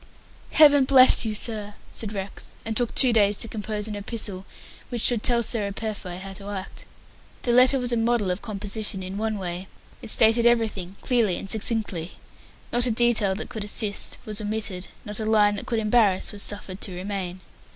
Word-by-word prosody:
"Heaven 290 -3 +6
bless 260 -2 +7
you, 215 -1 -2
sir,". 210 -2 -4 0.2
said 215 -3 -4
Rex, 195 -1 -3
and 220 0 -3
took 240 0 0
two 255 -3 +4
days 205 -2 +3
to 230 - -3
compose 210 -1 -5
an 210 - -5
epistle 205 -2 -5 0.4
which 240 -2 -2
should 240 -4 +3
tell 235 0 +1
Sarah 210 -3 +1
Purfoy 200 -4 -6
how 195 +1 -8
to 200 +1 -9
act. 195 -2 -8 0.6
The 240 - 0
letter 255 +3 +5
was 245 -1 -1
a 235 - +1
model 225 -4 +1
of 180 - -4
composition 205 -2 -2
in 190 +2 -6
one 220 -1 -2
way. 180 0 -5 0.3
It - - -4
stated 225 +2 +5
everything 215 -6 0
clearly 230 -7 +1
and - - -7
succinctly. 205 -5 0 0.6
Not 240 +1 +3
a - - +1
detail 220 -4 +2
that 220 - -7
could 220 -4 -5
assist 205 0 +2
was 215 0 -6
omitted 205 -3 -4 0.2
not 210 0 -5
a 220 - -3
line 210 -1 +3
that - - -8
could 230 - -1
embarrass 215 -3 +2
was 205 -1 -7
suffered 200 -2 -5
to 185 - -5
remain. 185 -1 -5
215 Hz, 190 wpm, -24 LUFS, 195-230 Hz, 0.6 s, bless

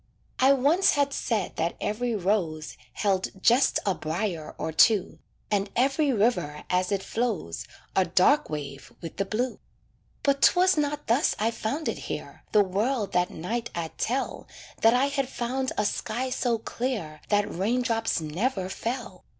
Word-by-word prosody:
I 265 +1 +6
once 290 +8 +3
had 285 -1 +1
said 215 -9 -2
that 165 +1 0
every 235 +2 -1
rose 175 -6 -1 0.2
Held 190 -2 -1
just 240 +7 +4
a 195 - +2
briar 160 0 -3
or 160 - -3
two, 195 +4 +3 0.3
And 200 -1 +1
every 275 +4 +2
river 205 - 0
as 180 +1 +1
it 195 -1 0
flows 220 - -2 0.3
A 190 - +4
dark 185 - +3
wave 140 -2 -6
with 165 - -8
the 195 - 0
blue; 240 +5 -2 0.6
But 280 -1 +2
'twas 365 +1 +5
not 295 -1 -1
thus 240 +6 +2
I 220 +2 +1
found 255 +8 -3
it - - -2
here, - - -6
The 210 -1 +5
world 205 +3 -1
that 180 0 +2
night 230 +8 -4
I'd 165 -2 -4
tell 260 +4 -2 0.3
That 225 +2 +6
I 255 +2 +4
had 280 -2 -1
found 260 +1 -2
a 210 - +1
sky 250 +5 -2
so 245 -2 +1
clear 220 - -4
That 205 -1 +2
rain 225 +8 0
drops 225 -4 0
never 185 - -2
fell. 225 -4 -5
220 Hz, 160 wpm, -27 LUFS, 185-255 Hz, 0.6 s, I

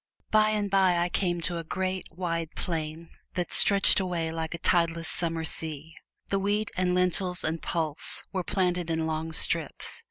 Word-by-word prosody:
By 215 0 +4
and 210 -1 0
by 190 -2 +3
I 175 +1 0
came 175 -2 -1
to 170 0 -2
a - - -6
great, 185 +3 -3
wide 165 -2 -3
plain 160 -1 -4 0.2
that 180 -1 -2
stretched 200 0 +7
away 175 -4 -2
like 160 0 -4
a - - -6
tideless 165 -1 +1
summer 165 -1 -1
sea. 160 0 -5 0.4
The 195 - +1
wheat 205 +2 -1
and 180 -1 0
lentils 180 0 +3
and 160 +1 -2
pulse 160 -3 -1
were 185 -1 -1
planted 180 -2 -1
in 160 -1 -1
long 160 0 -3
strips. 160 - -1
175 Hz, 170 wpm, -27 LUFS, 160-185 Hz, 0.4 s, stretched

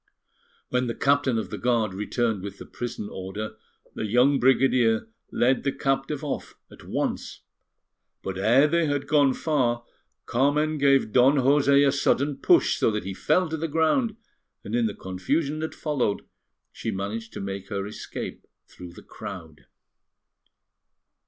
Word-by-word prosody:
When 125 0 0
the 115 - -3
Captain 140 -3 +2
of 110 - -4
the - - -5
Guard 115 -5 +1
returned 105 +1 -1
with 100 0 -7
the - - -10
prison 120 -4 -6
order, 100 +3 -6 0.4
the 110 - -3
young 125 +6 +4
brigadier 125 -4 +3 0.2
led 130 +2 +2
the 140 - +1
captive 135 +2 -1
off 145 - -4 0.2
at - - -14
once; - - -3 0.8
but 95 - -4
ere 115 +9 +4
they 170 0 +1
had 145 -1 -1
gone 145 -3 +3
far, 120 -6 0 0.4
Carmen 150 +4 +1
gave 140 -5 +3
Don 130 +4 +5
José 140 +1 +4
a - - +4
sudden 140 0 +1
push, 350 - +3
so - - +2
that 105 -2 -2
he 95 +1 -5
fell 180 - +1
to 160 - -3
the 165 +2 -2
ground, 165 - +1 0.5
and 105 - -7
in 120 -1 +2
the 105 - -5
confusion 140 - -2
that 160 0 -4
followed, 135 -9 -1 0.5
she - - -5
managed 110 +3 -4
to - - -6
make 100 0 -5
her 100 -2 -3
escape 105 - -7 0.2
through 90 -1 -11
the - - -13
crowd. 80 -2 -10
125 Hz, 155 wpm, -25 LUFS, 105-145 Hz, 0.8 s, Don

